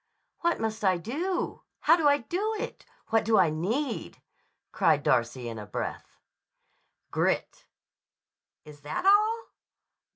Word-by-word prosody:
"What 340 0 +1
must 220 -1 -3
I 185 -2 +3
do? 315 - -3 0.2
How 325 - +6
do 325 -4 +2
I 285 0 +5
do 380 - -2
it? - - -6 0.2
What 225 0 +3
do 220 0 +3
I 165 -4 +4
need?" 225 - -2 0.5
cried 155 -3 +2
Darcy 120 0 +1
in 115 -1 -5
a 105 - -8
breath. - - -5 0.9
"Grit." - - -1 1.0
"Is 150 -1 -13
that 150 - -4
all?" 430 +3 +4
225 Hz, 130 wpm, -28 LUFS, -, 1.0 s, How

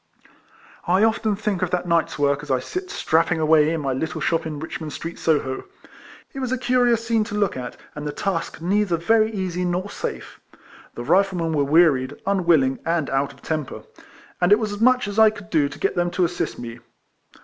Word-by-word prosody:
I 185 +4 +3
often 220 -1 +2
think 205 -3 -2
of 185 - 0
that 180 0 -2
night's 170 -1 +1
work 140 -1 +1
as 150 - -11
I 130 -1 +2
sit 365 - -5
strapping 165 +1 +1
away 155 -1 +4
in 165 -1 -1
my 135 -2 -1
little 145 +5 -3
shop 165 -1 0
in 155 -2 -5
Rich 160 +1 -6
mond 155 -2 -6
Street, 165 0 -6
Solio. 145 -5 0 0.7
It 270 - -6
was 260 -2 -3
a 260 - +1
curious 245 -2 +2
scene 225 -1 +2
to 210 - -6
look 205 -3 +1
at, 125 -1 -6 0.2
and 150 0 -6
the - - -2
task 165 -2 -3
neither 190 0 +1
very 220 +6 +2
easy 185 -3 -3
nor 180 +3 -2
safe. - - -6 0.6
The 120 - -5
Riflemen 175 +1 +2
were 145 -2 +2
wearied, 145 -3 +3
un 195 -3 0
willing, 135 -6 +3
and 165 -3 -1
out 135 +1 0
of 140 - -20
temper; 155 -4 -4 0.6
and 175 +2 +3
it 205 - +8
was 215 -2 -2
as 205 +1 -6
much 255 -1 +4
as 205 +2 -2
I 220 0 +8
could 210 0 -11
do 150 -4 +2
to 145 - -10
get - - 0
them 175 0 +1
to 180 0 +1
assist 175 +1 -3
me. 115 -1 -8
175 Hz, 215 wpm, -22 LUFS, 150-205 Hz, 0.7 s, it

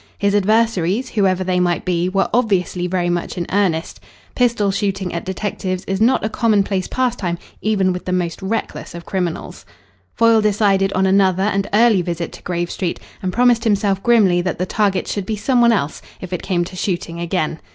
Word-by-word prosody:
His 200 0 +1
adversaries, 215 +1 +1
whoever 190 -3 +1
they 185 -1 0
might 175 -1 0
be, 180 0 0
were 195 +1 +1
obviously 190 -6 +1
very 175 -1 0
much 175 +2 -3
in 175 - -2
earnest. 180 -5 0 0.3
Pistol 235 -5 +1
shooting 195 -2 -2
at 170 - -3
detectives 185 -1 -3
is 195 +1 -2
not 235 0 +3
a - - +2
commonplace 205 -4 +1
pastime 235 -9 -1 0.2
even 195 -4 +1
with 180 - -6
the 185 - -3
most 180 -1 -2
reckless 200 -2 -4
of 170 -1 -9
criminals. 180 -4 -4 0.5
Foyle 230 -1 +4
decided 200 -2 +2
on 190 +1 +2
another 190 -1 +3
and 195 -1 0
early 215 -2 +4
visit 170 -1 -4
to - - -12
Grave 175 -1 -3
Street, 180 -3 -3 0.2
and 185 - -2
promised 240 +1 +3
himself 200 -3 +1
grimly 200 -7 +4
that 180 -1 -2
the 180 - -1
target 195 -1 0
should 200 -2 -3
be 220 - -1
some 240 +4 +1
one 235 0 +5
else, 160 -9 -1 0.2
if 185 -1 -7
it 180 - -2
came 175 -2 0
to 185 - -10
shooting 175 -2 -3
again. 170 -2 -2
190 Hz, 190 wpm, -19 LUFS, 180-215 Hz, 0.5 s, one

